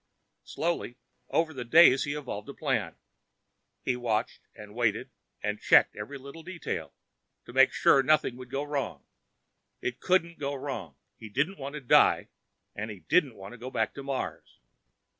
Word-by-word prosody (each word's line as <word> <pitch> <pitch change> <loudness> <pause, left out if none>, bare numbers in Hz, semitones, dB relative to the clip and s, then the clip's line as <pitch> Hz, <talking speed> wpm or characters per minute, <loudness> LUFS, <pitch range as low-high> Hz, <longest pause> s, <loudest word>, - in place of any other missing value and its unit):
Slowly, 165 -7 -2 0.3
over 160 -1 +1
the 130 -3 -5
days, 135 0 +6
he 145 0 -2
evolved 120 -8 -6
a - - -8
plan. - - -1 0.9
He 125 - 0
watched 115 -3 -2
and 105 -1 -11
waited 110 -2 0 0.3
and 105 0 -2
checked - - +5
each 105 - -6 0.2
little 140 +5 -10
detail 175 +1 -5 0.5
to 120 - -11
make 135 +1 +6
sure 135 - +5
nothing 135 -2 +2
would 125 -1 -10
go 135 +2 -2
wrong. 145 -2 -4 0.7
It 125 - -4
couldn't 170 -3 +1
go 140 -1 -2
wrong. 130 - -5 0.2
He 110 - -10
didn't 150 - -1
want 140 +1 -6
to 150 - -5
die, 125 - +4 0.5
and 105 +2 -4
he 100 -4 -9
didn't 150 -9 +2
want 95 0 -10
to 120 - -11
go 125 +2 -6
back 110 -4 -1
to 140 - -7
Mars. 135 -1 -5
135 Hz, 165 wpm, -29 LUFS, 115-150 Hz, 0.9 s, days